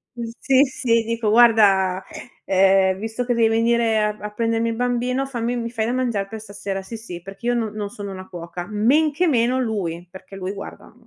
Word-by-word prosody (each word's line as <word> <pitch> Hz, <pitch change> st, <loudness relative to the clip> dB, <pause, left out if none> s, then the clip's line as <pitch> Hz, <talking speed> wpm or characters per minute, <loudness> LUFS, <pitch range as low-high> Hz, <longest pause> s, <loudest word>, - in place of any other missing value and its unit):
Mhmm, 235 Hz, -1 st, -5 dB
sì, 265 Hz, -1 st, +4 dB
sì 245 Hz, -4 st, +1 dB
dico: 225 Hz, -1 st, -1 dB
"Guarda, 200 Hz, -5 st, +5 dB, 0.4 s
ehm, 190 Hz, 0 st, +3 dB
visto 225 Hz, +3 st, -3 dB
che 245 Hz, -, +1 dB
devi 230 Hz, -1 st, +3 dB
venire 230 Hz, 0 st, +2 dB
a 210 Hz, 0 st, 0 dB
a 210 Hz, -, -4 dB
prendermi 230 Hz, +1 st, 0 dB
il 230 Hz, -, -2 dB
bambino 245 Hz, +2 st, 0 dB
fammi 245 Hz, -2 st, -3 dB
mi 235 Hz, -1 st, -3 dB
fai 225 Hz, -2 st, -1 dB
da -, -, 0 dB
mangiar 240 Hz, -6 st, -1 dB
per 220 Hz, +2 st, -7 dB
stasera?" 200 Hz, -2 st, -6 dB
Sì, 225 Hz, +4 st, -7 dB
sì, 200 Hz, -6 st, -8 dB
perché 195 Hz, +5 st, -8 dB
io 245 Hz, -, +3 dB
n 225 Hz, -3 st, -1 dB
non 210 Hz, -1 st, -4 dB
sono 205 Hz, -3 st, -7 dB
una 185 Hz, 0 st, -9 dB
cuoca, 175 Hz, 0 st, -7 dB
men 260 Hz, +9 st, +3 dB
che 310 Hz, +6 st, 0 dB
meno 255 Hz, -4 st, +2 dB
lui, 180 Hz, -8 st, -3 dB
perché 190 Hz, +1 st, -12 dB
lui 190 Hz, 0 st, -4 dB
guarda 200 Hz, +2 st, -10 dB
225 Hz, 205 wpm, -22 LUFS, 195-240 Hz, 0.4 s, Guarda